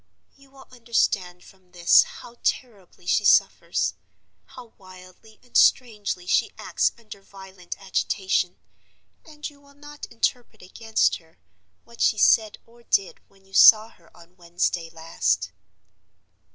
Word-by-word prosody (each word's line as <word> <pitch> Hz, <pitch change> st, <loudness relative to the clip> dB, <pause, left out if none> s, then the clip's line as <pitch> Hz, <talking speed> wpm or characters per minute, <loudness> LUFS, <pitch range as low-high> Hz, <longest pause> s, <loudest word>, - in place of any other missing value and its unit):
You 275 Hz, 0 st, -22 dB
will 270 Hz, 0 st, -18 dB
understand 205 Hz, -7 st, -2 dB
from 185 Hz, -2 st, -22 dB
this 175 Hz, -1 st, +5 dB
how 240 Hz, 0 st, -10 dB
terribly 200 Hz, -8 st, -4 dB
she 205 Hz, -, +1 dB
suffers, 200 Hz, -, +2 dB, 0.5 s
how 245 Hz, -3 st, -15 dB
wildly 185 Hz, +3 st, -17 dB
and 245 Hz, -, -26 dB
strangely 210 Hz, -7 st, +2 dB
she -, -, +1 dB
acts -, -, -1 dB
under 215 Hz, -4 st, -13 dB
violent 190 Hz, -2 st, -11 dB
agitation; 190 Hz, -1 st, -2 dB, 0.7 s
and 300 Hz, -2 st, -9 dB
you 285 Hz, -2 st, -16 dB
will 280 Hz, 0 st, -22 dB
not 295 Hz, 0 st, -11 dB
interpret 230 Hz, -2 st, -3 dB
against 220 Hz, +4 st, -1 dB
her 160 Hz, -1 st, -26 dB, 0.5 s
what 235 Hz, 0 st, -14 dB
she 215 Hz, -, +2 dB
said 215 Hz, 0 st, +3 dB
or 235 Hz, +1 st, -22 dB
did 200 Hz, -5 st, -1 dB
when 195 Hz, -1 st, -27 dB
you 195 Hz, -, -25 dB
saw 215 Hz, +2 st, +7 dB
her 170 Hz, -6 st, -24 dB
on 170 Hz, +1 st, -19 dB
Wednesday 170 Hz, -1 st, -3 dB
last. 165 Hz, 0 st, -2 dB
200 Hz, 135 wpm, -23 LUFS, 180-235 Hz, 0.7 s, saw